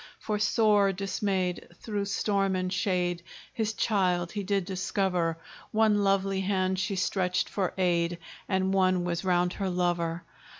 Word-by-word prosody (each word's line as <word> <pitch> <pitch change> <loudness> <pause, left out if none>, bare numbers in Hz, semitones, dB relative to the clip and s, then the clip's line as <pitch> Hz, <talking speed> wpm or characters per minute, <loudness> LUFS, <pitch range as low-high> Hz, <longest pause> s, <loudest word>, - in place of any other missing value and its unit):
For 210 -1 -3
sore 210 -1 +3
dismayed, 190 -2 -2
through 205 +1 -3
storm 195 -1 0
and 185 0 -1
shade, 180 -2 0 0.3
His 220 -2 -1
child 180 -6 +1
he 205 - -3
did 195 -1 0
discover: 185 -3 -1 0.3
One 215 -2 +3
lovely 195 0 +1
hand 190 -1 0
she 190 +1 -1
stretched 180 -1 0
for 190 -3 -2
aid, 175 -2 +1 0.3
And 190 0 +1
one 185 -2 +3
was 170 0 -2
round 180 -1 +2
her 195 -2 -2
lover. 175 -2 -1
190 Hz, 140 wpm, -28 LUFS, 180-200 Hz, 0.3 s, sore